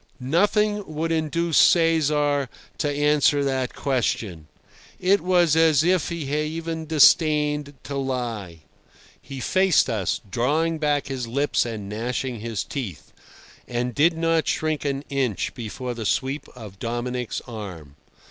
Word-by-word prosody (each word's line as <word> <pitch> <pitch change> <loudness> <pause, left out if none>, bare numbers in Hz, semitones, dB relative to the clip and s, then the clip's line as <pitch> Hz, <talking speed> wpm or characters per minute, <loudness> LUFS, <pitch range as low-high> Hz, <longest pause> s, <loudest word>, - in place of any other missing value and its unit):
Nothing 205 - +1
would 165 +2 -1
induce 165 +1 +1
Cesar 150 -5 +3 0.3
to 145 - 0
answer 145 0 +3
that 130 -2 -1
question. 110 - -2 0.5
It 190 +2 +3
was 175 -3 +3
as 160 -3 +4
if 180 -1 +2
he 170 -2 -4 0.2
even 160 +1 -4
disdained 150 -2 +3
to 140 0 -5
lie. 120 - -4 0.6
He 135 +1 -8
faced 185 -2 +3
us, 105 -5 -1
drawing 155 - 0
back 145 -2 +1
his 130 -3 -4
lips 140 +1 0
and 110 -4 -6
gnashing 120 +3 -3
his 110 -1 -3
teeth, 115 - -7 0.5
and 125 0 -2
did 160 +6 +3
not 165 -1 +1
shrink 155 -1 -1
an 140 0 -1
inch 135 -7 -1
before 125 +1 -5
the 115 -3 -4
sweep 135 +4 -1
of 105 -5 -11
Dominic's 120 +1 -3
arm. 95 - -9
140 Hz, 130 wpm, -24 LUFS, 120-160 Hz, 0.6 s, as